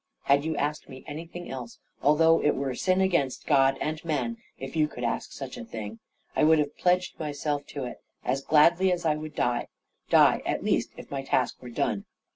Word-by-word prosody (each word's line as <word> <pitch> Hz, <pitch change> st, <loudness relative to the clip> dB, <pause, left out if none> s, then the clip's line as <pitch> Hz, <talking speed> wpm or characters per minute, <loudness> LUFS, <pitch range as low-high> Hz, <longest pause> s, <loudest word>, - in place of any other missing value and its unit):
"Had 140 Hz, +1 st, +4 dB
you 160 Hz, -1 st, -1 dB
asked 150 Hz, +1 st, -2 dB
me 130 Hz, -1 st, -10 dB
anything 165 Hz, +4 st, -7 dB
else, 125 Hz, -3 st, -7 dB, 0.2 s
although 160 Hz, +3 st, +5 dB
it 150 Hz, -, +2 dB
were 135 Hz, -1 st, -2 dB
sin 185 Hz, +8 st, +1 dB
against 170 Hz, -9 st, +1 dB
God 135 Hz, -2 st, +4 dB
and 155 Hz, +1 st, -3 dB
man 170 Hz, +9 st, -1 dB, 0.2 s
(if 135 Hz, +3 st, -7 dB
you 155 Hz, -1 st, +3 dB
could 125 Hz, -4 st, -8 dB
ask 115 Hz, -, -2 dB
such -, -, -7 dB
a -, -, -6 dB
thing) 110 Hz, 0 st, -7 dB, 0.4 s
I -, -, +3 dB
would 160 Hz, +1 st, +6 dB
have 150 Hz, -1 st, -1 dB
pledged 180 Hz, 0 st, +1 dB
myself 145 Hz, -1 st, -2 dB
to 140 Hz, -, -5 dB
it, 125 Hz, -, -7 dB, 0.2 s
as 135 Hz, +2 st, 0 dB
gladly 170 Hz, +6 st, +5 dB
as 175 Hz, -1 st, -1 dB
I 155 Hz, -1 st, +3 dB
would 155 Hz, 0 st, -7 dB
die 120 Hz, -1 st, 0 dB, 0.4 s
die, -, -, +6 dB
at -, -, -2 dB
least, -, -, +1 dB
if -, -, -11 dB
my 140 Hz, -1 st, -2 dB
task 130 Hz, -2 st, 0 dB
were 125 Hz, -, -8 dB
done. 105 Hz, -3 st, -1 dB
150 Hz, 205 wpm, -27 LUFS, 135-160 Hz, 0.4 s, would